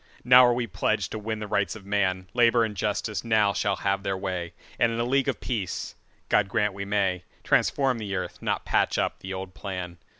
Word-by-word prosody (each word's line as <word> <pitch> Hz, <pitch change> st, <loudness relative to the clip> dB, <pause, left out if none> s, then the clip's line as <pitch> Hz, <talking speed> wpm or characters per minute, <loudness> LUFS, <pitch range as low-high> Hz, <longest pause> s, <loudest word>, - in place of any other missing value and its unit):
Now 125 Hz, +1 st, +8 dB
are 120 Hz, -, +3 dB
we 120 Hz, -1 st, -1 dB
pledged 100 Hz, 0 st, -1 dB
to 110 Hz, -, -4 dB
win 110 Hz, +1 st, -3 dB
the 105 Hz, 0 st, -5 dB
Rights 100 Hz, +1 st, 0 dB
of 105 Hz, -3 st, -11 dB
man; 95 Hz, -2 st, 0 dB
Labour 120 Hz, -1 st, +4 dB
and 105 Hz, -2 st, -5 dB
Justice 105 Hz, +2 st, -2 dB
now 110 Hz, -3 st, +3 dB
shall 100 Hz, -1 st, 0 dB
have 100 Hz, 0 st, -1 dB
their 95 Hz, 0 st, -2 dB
way, 90 Hz, -3 st, -4 dB, 0.3 s
And 115 Hz, -, +3 dB
in 115 Hz, -, -3 dB
a -, -, +2 dB
League 135 Hz, +2 st, +1 dB
of -, -, -1 dB
Peace—God 105 Hz, -2 st, -2 dB
grant 105 Hz, -3 st, +1 dB
we 100 Hz, +1 st, -5 dB
may—Transform 100 Hz, +6 st, 0 dB
the 100 Hz, -3 st, -4 dB
earth, 90 Hz, -, -5 dB
not -, -, -2 dB
patch -, -, +1 dB
up -, -, -1 dB
the 95 Hz, -, -7 dB
old 95 Hz, -1 st, -6 dB
plan. 90 Hz, -4 st, -6 dB
100 Hz, 205 wpm, -26 LUFS, 95-115 Hz, 0.3 s, Now